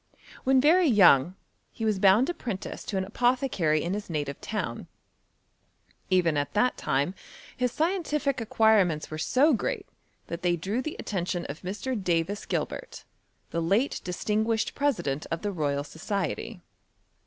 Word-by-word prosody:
When 265 0 +5
very 330 +6 +5
young, 180 - +5 0.4
he 225 - -4
was 215 -3 +1
bound 200 +6 +5
apprentice 240 - -5
to 200 - -3
an 190 - 0
apothecary 235 - +1
in 175 - -2
his 205 -1 -5
native 145 -3 -3
town. - - -4 1.2
Even 175 -5 +3
at 145 0 -2
that 250 +4 +3
time, 140 +7 0 0.4
his 250 -1 0
scientihc 300 -6 0
acquirements 210 -9 +2
were 155 - -5
so 280 - +3
great, 225 - -2 0.4
that 170 +1 -6
they 175 -1 +2
drew 195 +9 -2
the 310 - -5
attention 175 -3 -3
of 145 +4 -7
Mr, 205 +8 -4
Davis 175 +3 -1
Gilbert, - - -4 0.5
the 170 - -1
late 200 +11 +1
distinguished 215 +5 -1
president 175 - -1
of 165 +3 -3
the 205 - -1
Royal 145 -5 -1
Society. 170 +4 -4
200 Hz, 140 wpm, -27 LUFS, 170-250 Hz, 1.2 s, When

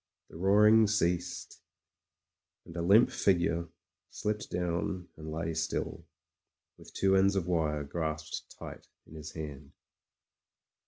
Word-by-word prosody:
The - - -13
roaring 105 +4 +6
ceased, 90 -3 -1 1.0
and 85 - -12
a 85 - -2
limp 100 +8 +5
figure 85 -3 +1 0.4
slipped 105 0 -3
down 90 +1 -2
and 80 0 -8
lay 80 +1 -2
still, 80 0 -3 0.7
with - - -14
two 95 0 +3
ends 100 +1 +4
of 95 -3 0
wire 80 -4 0
grasped 80 +1 -4
tight - - -9 0.2
in - - -15
his 80 0 -8
hand. 75 -4 -8
85 Hz, 120 wpm, -31 LUFS, 80-95 Hz, 1.0 s, roaring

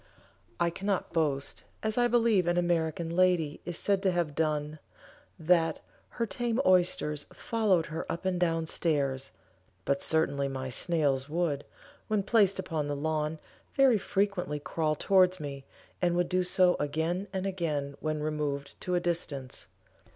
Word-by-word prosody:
I 170 0 +2
cannot 195 +2 -2
boast, 145 -4 -1 0.2
as 220 0 0
I 245 0 +3
believe 230 -6 +3
an 175 0 +2
American 170 -1 0
lady 175 -5 +2
is 175 -1 -4
said 200 -1 +1
to 190 -2 +2
have 170 -4 -1
done, 150 0 -1 0.6
that 165 -1 +2 0.3
"her 235 - -2
tame 230 +4 -1
oysters 175 -5 +2
followed 205 -8 +1
her 160 +2 -5
up 170 - -5
and 185 -1 0
down 165 -2 +1
stairs," 140 -5 0 0.6
but 140 0 +1
certainly 140 -3 +1
my 130 -1 -4
snails 140 -2 0
would, 155 -3 -1 0.4
when 215 -2 +1
placed 200 -2 +3
upon 160 -6 -2
the 145 - -2
lawn, 155 +1 -1 0.4
very 265 -6 +5
frequently 195 -7 -1
crawl 155 +2 -1
towards 185 +2 +3
me, 140 -2 -6 0.4
and 175 -1 +2
would 175 0 +1
do 185 0 +2
so 180 0 +3
again 160 +6 -1
and 190 -1 -3
again 155 -7 -2
when 155 -1 -2
removed 150 -2 -2
to 180 - -1
a - - +3
distance. 150 - -4
170 Hz, 150 wpm, -29 LUFS, 150-185 Hz, 0.6 s, very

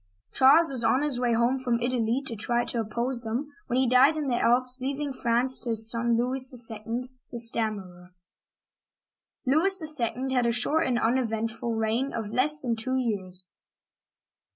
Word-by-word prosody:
Charles 285 +4 +5
was 250 -3 -1
on 260 +4 +2
his 285 -5 -1
way 240 -1 +1
home 235 +3 +1
from 245 -3 -1
Italy 245 +1 -1
to 235 - -5
try 240 +3 -1
to 235 - -4
oppose 235 +3 -2
them, 245 +6 -5
when 245 - -1
he 260 0 +2
died 260 +6 +4
in 300 - -3
the 240 - 0
Alps, 250 +2 +1
leaving 280 +1 -3
France 245 +1 +1
to 245 - -5
his 225 -1 +2
son 235 0 0
Louis 255 +3 -1 0.3
II., 230 +4 -6 0.2
"the 240 - -6
Stammerer.'* 200 -6 -1 1.3
Louis 315 +2 +3
II. 255 +3 -2
had 250 -2 +1
a - - +2
short 295 +7 +1
and 250 -2 0
uneventful 230 -1 -2
reign 225 +5 -1
of 220 -2 -5
less 300 +4 +3
than 240 -3 -2
two 255 +4 -3
years. 190 -7 -2
240 Hz, 170 wpm, -26 LUFS, 230-260 Hz, 1.3 s, Charles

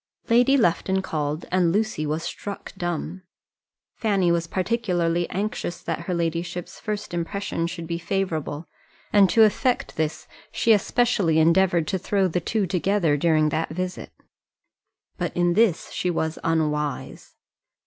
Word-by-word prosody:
Lady 245 +4 +5
Lufton 190 -2 +1
called, 150 -2 -3
and 180 -2 +3
Lucy 205 -6 0
was 155 +2 -2
struck 200 -1 -6
dumb. 175 -1 -4 0.7
Fanny 195 -6 +1
was 170 -1 0
particularly 175 -4 0
anxious 195 -3 -3
that 165 - -2
her - - +1
ladyship's 170 +1 -3
first 210 -3 -4
impression 170 0 -2
should 170 -1 -6
be 170 0 -3
favourable, 165 -4 -2 0.5
and 200 -2 +6
to 225 - +6
effect 245 +4 +1
this, 155 0 -2 0.2
she 230 - +3
especially 205 -6 +2
endeavoured 170 0 +3
to 190 +1 -1
throw 195 +1 +1
the 180 0 -1
two 210 +4 0
together 180 -3 +1
during 155 0 +3
that 160 +2 -1
visit. 180 +3 -5 1.1
But - - -3
in 175 0 +3
this 205 -4 +2
she 180 - -1
was 160 -2 -2
unwise. 150 -3 -2
175 Hz, 140 wpm, -24 LUFS, 165-200 Hz, 1.1 s, and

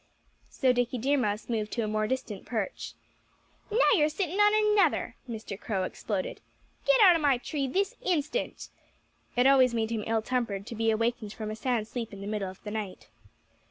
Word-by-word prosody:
So 260 -2 +2
Dickie 245 0 0
Deer 270 +5 +1
Mouse 210 -3 -1
moved 215 -3 -2
to 235 - -1
a - - -1
more 215 0 0
distant 255 -6 -3
perch. 220 -5 -4 0.7
"Now 440 +3 +4
you're 305 -7 +4
sitting 360 +4 -2
on 425 0 +4
another!" 335 - +2
Mr. 215 -3 -6
Crow 195 -6 -2
exploded. 190 +1 -4 0.5
"Get - - +5
out 370 -4 +8
of 330 - 0
my 280 -3 +4
tree 275 +2 -3
this 390 +9 0
instant!" 340 - -2 0.7
It 245 +1 +3
always 260 -3 +5
made 225 0 -1
him 220 -2 -2
ill 225 -1 +1
tempered 225 -6 -2
to 230 - -7
be 225 +1 +1
awakened 225 -1 0
from 215 -1 -5
a - - -4
sound 225 -1 -1
sleep 230 -2 -5
in 200 - -8
the - - -6
middle 205 -2 -2
of 185 - -13
the 210 - -6
night. 210 -3 -5
235 Hz, 195 wpm, -28 LUFS, 215-285 Hz, 0.7 s, out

